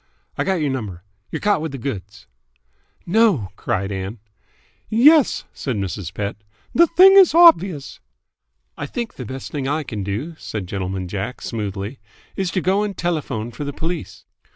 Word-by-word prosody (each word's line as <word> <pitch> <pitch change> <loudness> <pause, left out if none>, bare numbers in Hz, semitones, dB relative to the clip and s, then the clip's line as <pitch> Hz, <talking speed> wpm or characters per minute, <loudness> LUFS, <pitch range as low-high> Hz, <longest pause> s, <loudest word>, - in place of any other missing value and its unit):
"I - - 0
got 190 -2 0
y'r 150 - 0
number. 100 -9 -5 0.3
Y're - - -4
caught 205 -5 +2
with 160 -3 -4
th' 135 - -5
goods." 105 -5 -6 0.8
"No!" 180 - +2
cried 100 0 -2
Ann. 95 +3 -4 0.7
"Yes!" 280 +6 +5
said 130 -4 -3
Mrs. 95 -3 -4
Pett. 100 +1 -4 0.4
"The 340 +1 +6
thing 375 +4 +7
is 375 -5 +7
obvious." 195 - +5 0.8
"I - - -5
think 235 -3 -4
the 125 - -7
best 130 +4 -7
thing 140 -3 -3
I 150 +2 0
can 105 -7 -5
do," 110 - -4
said 105 -4 -5
Gentleman 95 0 -4
Jack 100 +6 -4
smoothly, 105 +2 -4 0.4
"is 190 -2 -1
to 185 - -1
go 190 +3 +2
and 205 -3 -3
telephone 140 -10 -2
for 145 - -6
the 145 0 -4
police." 165 +3 -5
135 Hz, 165 wpm, -21 LUFS, -, 0.8 s, thing